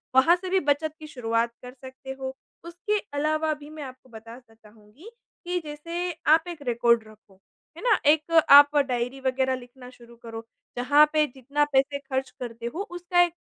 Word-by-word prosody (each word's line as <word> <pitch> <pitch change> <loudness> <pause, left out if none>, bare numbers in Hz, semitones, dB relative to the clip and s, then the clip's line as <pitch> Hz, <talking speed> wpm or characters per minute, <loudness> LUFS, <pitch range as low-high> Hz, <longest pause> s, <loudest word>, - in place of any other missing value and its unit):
वहाँ 325 +7 +6
से 370 +1 -7
भी 380 0 +3
बचत 295 +1 0
की 310 - -10
शुरुआत 235 -4 -1
कर 250 0 -9
सकते 260 0 -11
हो। 265 0 -5 0.3
उसके 355 +5 -2 0.2
अलावा 310 +2 0
भी 295 0 -12
मैं 305 -1 -8
आपको 255 -1 -12
बताना 230 +1 -13
चाहूँगी 220 - -17 0.4
कि 355 0 -1
जैसे 335 +4 -4 0.2
आप 320 +3 +5
एक 335 -4 -7
रिकॉर्ड 235 -1 +2
रखो। 210 -3 -20 0.4
है - - -9
ना? 460 -4 +4
एक 305 +2 +3 0.2
आप 285 +1 +9
डायरी 255 -1 -1
वग़ैरह 260 0 0
लिखना 250 0 -12
शुरू 235 -1 -17
करो, 230 -1 -9 0.3
जहाँ 290 +5 +5
पे 305 -1 +3
जितना 280 +3 0
पैसे 275 +1 +2
ख़र्च 265 -1 -3
करते 235 -2 -7
हो 370 - -3
उसका 350 0 +1
एक 345 -1 +2
270 Hz, 180 wpm, -25 LUFS, 245-310 Hz, 0.4 s, आप